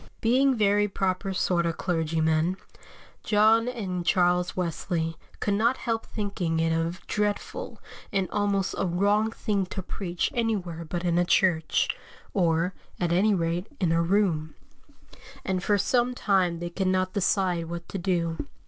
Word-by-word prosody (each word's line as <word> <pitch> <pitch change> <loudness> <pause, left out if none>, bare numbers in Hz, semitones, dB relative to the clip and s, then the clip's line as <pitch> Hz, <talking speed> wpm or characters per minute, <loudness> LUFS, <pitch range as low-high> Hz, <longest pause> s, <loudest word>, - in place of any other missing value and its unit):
Being 260 +4 +3
very 205 -1 +3
proper 190 -1 -1
sort 180 -2 +1
of 165 - -2
clergymen, 160 0 0 0.6
John 220 +2 +4
and 195 -8 -3
Charles 180 0 +2
Wesley 165 -1 -2 0.2
could 205 - 0
not 230 +5 +2
help 225 -2 -2
thinking 190 -6 -2
it 165 0 +2
a 165 +2 -1
dreadful, 210 - -2 0.3
and 195 -3 0
almost 200 -2 0
a - - +1
wrong 205 +5 +2
thing 205 -4 -1
to 190 +1 -5
preach 175 -2 -3
anywhere 195 -8 -1
but 175 +2 -4
in 175 0 +2
a - - +4
church, 175 -3 +2 0.5
or, 170 -1 +1 0.3
at 175 -1 +1
any 200 +4 +3
rate, 170 +2 -1
in 175 -4 +1
a 165 0 +3
room; 170 -4 +1 0.9
and 185 -1 -1
for 205 - +3
some 245 +5 +1
time 185 -7 +1
they 175 +1 -5
could 190 +2 -1
not 185 0 +1
decide 185 -4 +1
what 170 0 -6
to 195 - -4
do. 170 -4 -1
185 Hz, 150 wpm, -27 LUFS, 170-205 Hz, 0.9 s, John